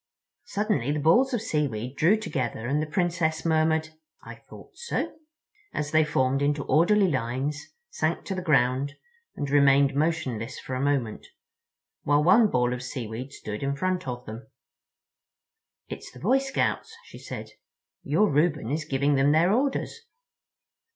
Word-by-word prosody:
Suddenly 205 - -1
the 150 - -1
balls 240 - +4
of 240 -4 -1
seaweed 135 - -2
drew 175 +10 +4
together 125 - -3
and 145 +5 0
the 155 - -3
Princess 170 -2 0
murmured, 160 0 +2 0.3
"I - - -9
thought - - -15
so," 475 -1 -3 0.6
as 145 -1 -2
they 155 0 +4
formed 135 -2 +1
into 145 0 0
orderly 190 +5 +3
lines, 135 +1 -2 0.2
sank - - -1
to 195 - -3
the 185 - -3
ground, 140 -3 +1 0.4
and 145 - -3
remained 140 0 +4
motionless 135 -6 -1
for 130 - -7
a 130 - -2
moment, 135 -6 -1 0.7
while 145 +1 +2
one 215 +6 +5
ball 125 -4 +1
of 125 - -5
seaweed 125 +1 -6
stood 105 -5 -7
in 140 0 -1
front 185 +1 -2
of 125 0 -5
them. 115 +5 -9 1.4
"It's - - -8
the - - -13
Boy 265 - +3
Scouts," 270 +11 -2
she - - -13
said. - - -8 0.5
"Your 210 - +2
Reuben 150 - +1
is 150 +1 -2
giving 140 0 +1
them 135 +1 +3
their 170 +5 +4
orders." 270 +4 0
145 Hz, 150 wpm, -26 LUFS, 130-170 Hz, 1.4 s, one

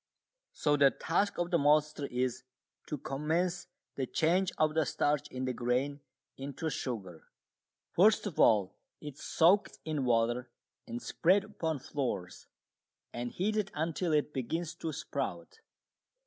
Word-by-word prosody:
So 145 -1 +2
the 140 -1 +7
task 170 - 0
of 175 +1 -1
the 170 - +3
maltster 150 0 +3
is 125 -1 -1 0.5
to 150 - -3
commence 170 +7 -1 0.3
the 135 -2 -3
change 180 +6 +2
of 155 -1 +2
the 160 0 +3
starch 145 -1 0
in 130 0 -4
the 130 - -1
grain 125 +4 0 0.4
into 145 +4 -4
sugar. 100 - -5 0.6
First 215 +6 +4
of 195 -7 -5
all 100 -4 +5 0.3
it 150 -2 -7
is 140 - -16
soaked 180 +5 +3
in 155 -3 -1
water 120 +1 +1 0.4
and 120 +1 -4
spread 185 +9 +2
upon 165 -7 -3
floors 120 -10 -4 0.7
and 120 0 -4
heated 210 +1 0
until 165 +2 -1
it 150 -1 +1
begins 160 +6 -2
to 160 - -3
sprout. 445 - -5
150 Hz, 140 wpm, -32 LUFS, 130-170 Hz, 0.7 s, the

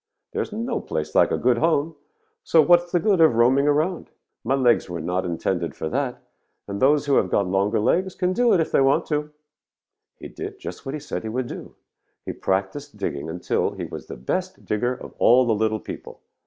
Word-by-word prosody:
There - - -2
is - - -5
no 230 +3 -2
place 75 0 -4
like - - +4
a - - 0
good 120 -1 +2
home, 160 -1 +1 0.5
so 165 - +3
what 175 +3 +5
is 175 - -20
the 175 - +2
good 195 -3 +2
of 160 -7 +5
roaming 130 +5 +4
around? 155 +5 0 0.3
My 130 +4 +1
legs 125 -7 +2
were 85 -1 -4
not 90 +4 -2
intended 85 0 -2
for 80 - -4
that, 135 - -3 0.4
and 100 0 -5
those 145 +3 +4
who 140 -1 +3
have 95 - +2
got 100 - +1
longer 95 +3 +1
legs 185 - +1
can 180 0 0
do 240 +2 +3
it 185 - +4
if 160 - -1
they - - +3
want 135 +5 +3
to.' 150 -1 -2 0.9
"He - - -9
did 400 +1 -7
just 270 - -8
what 135 - -3
he - - -4
said - - -5
he 110 - -5
would 125 +3 -2
do. - - -9 0.5
He - - -4
practised 100 +8 -3
digging 80 -6 -4
until 85 +2 -1
he - - -5
was - - -8
the - - -8
best 60 - -4
digger 120 +4 -1
of - - -11
all 125 +2 +5
the 115 - +2
little 110 0 0
people. - - -9
130 Hz, 220 wpm, -23 LUFS, 100-160 Hz, 0.9 s, what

